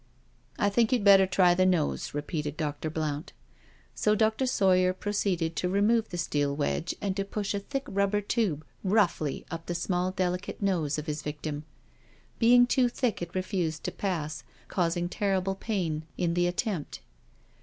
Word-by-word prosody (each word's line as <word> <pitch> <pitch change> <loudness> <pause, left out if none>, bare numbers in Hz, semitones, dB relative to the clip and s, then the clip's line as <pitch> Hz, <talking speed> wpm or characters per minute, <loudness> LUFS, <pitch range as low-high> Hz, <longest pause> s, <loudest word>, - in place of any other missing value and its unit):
" - - -37
I 205 - +2
think 230 +2 +2
you'd 245 -5 +2
better 195 -1 +7
try 180 -2 +4
the 185 +1 +3
nose," 180 -5 +1
repeated 150 0 -3
Dr. 150 -1 -3
Blount. 155 -1 -3 0.6
So 210 0 +2
Dr. 220 +4 +2
Sawyer 185 -5 +3
proceeded 185 -4 -1
to 180 - 0
remove 215 +4 +2
the 175 - -5
steel 145 -4 0
wedj^e 155 +3 -1
and 195 -2 -1
to 195 - 0
push 200 0 -3
a 200 - -1
thick 270 +7 -4
rubber 200 +1 +1
tube 200 - -1 0.2
roughly 185 -7 +1
up 165 0 -6
the 175 - -2
small 180 +1 0
delicate 180 -1 -2
nose 170 -8 0
of 150 - -4
his 150 -1 -3
victim. 150 0 -5 0.7
Being 245 +1 +6
too 250 0 +2
thick 240 -5 -1
it 175 +1 -6
refused 185 -4 -2
to - - -2
pass, 155 -6 -3 0.3
causing 175 -1 0
terrible 195 0 0
pain 175 -7 -2
in 170 -2 0
the 175 0 +2
attempt. 180 -2 -3
185 Hz, 165 wpm, -28 LUFS, 160-200 Hz, 0.7 s, better